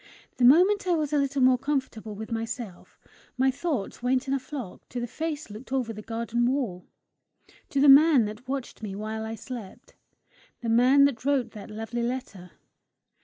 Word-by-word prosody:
The 245 - +3
moment 370 +9 +5
I 355 - +3
was 305 -2 -2
a 295 - +3
little 275 -1 0
more 255 -1 +5
comfortable 260 -6 -3
with 220 +3 -8
myself, 225 -4 -6 0.4
my 265 +1 +3
thoughts 275 - -3
went 255 +2 0
in 270 - 0
a 275 - +1
flock 260 -6 -8
to 245 - -4
the 240 - -2
face 310 +4 -4
that 205 - -12
looked 240 +5 -11
over 250 -4 -1
the 215 - -8
garden 235 +2 -1
wall, 245 -10 -2 0.8
to 280 - -1
the 285 - +5
man 280 -3 +7
that 215 +4 -8
watched 265 -3 -5
me 205 -3 -5
while 215 +2 -4
I 220 0 -5
slept, 240 0 -9 0.7
the 235 - -3
man 255 +5 +5
that 255 -5 -1
wrote 265 -4 +1
that 210 - -10
lovely 225 +3 -4
letter. 235 -7 -4
250 Hz, 185 wpm, -27 LUFS, 225-275 Hz, 0.8 s, man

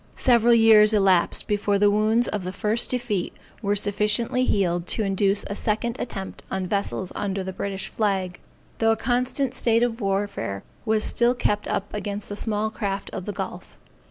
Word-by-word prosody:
Several 235 -1 +4
years 220 -1 +6
elapsed 190 -4 +3
before 205 -1 +1
the 205 0 +4
wounds 220 +3 +2
of 205 -3 -3
the 185 - -4
first 210 +4 +1
defeat 240 -7 -2 0.3
were 205 -2 0
sufficiently 210 +5 +1
healed 175 -5 0
to 220 - -1
induce 195 0 +1
a 200 - -4
second 220 +3 -1
attempt 195 -5 -6
on 190 -1 -2
vessels 195 -1 -2
under 195 -1 -3
the 190 0 -5
British 195 0 -4
flag, 190 -4 -2 0.4
though 225 0 +4
a - - -4
constant 250 +3 0
state 230 0 +2
of 235 -1 -1
warfare 195 - -2 0.2
was 220 -1 +1
still 240 +1 +2
kept 210 -4 -1
up 200 - -3
against 205 0 -4
the 205 - -4
small 215 0 -1
craft 200 -3 -4
of 180 - -6
the 205 - -3
gulf. - - -7
210 Hz, 175 wpm, -24 LUFS, 195-225 Hz, 0.4 s, years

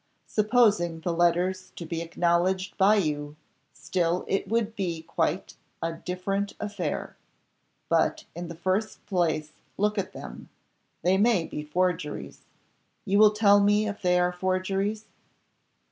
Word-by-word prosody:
"Supposing 210 -7 +2
the 175 +1 -1
letters 180 +2 +1
to 170 - -7
be 165 0 -3
acknowledged 175 +3 0
by 200 +2 +5
you, 150 -6 -1 0.4
still 175 -1 -1
it 195 - -1
would 225 +1 0
be 170 -5 -3
quite 165 +2 -2 0.2
a 165 0 -2
different 190 +4 -3
affair. 205 -4 -4 0.7
But - - +1
in 175 +1 -6
the 170 - -7
first 190 +6 -2
place 160 -5 0 0.3
look 210 +1 +1
at 190 - -3
them, 65 -1 -9 0.5
they 185 +3 +3
may 205 -6 +3
be 150 - -5
forgeries. 165 0 -2 0.6
You 200 +2 +2
will 215 0 +8
tell 205 -1 +5
me 205 +1 +3
if 205 0 -5
they 180 -1 +3
are 180 0 +2
forgeries?" 190 +4 -1
185 Hz, 135 wpm, -27 LUFS, 170-205 Hz, 0.7 s, will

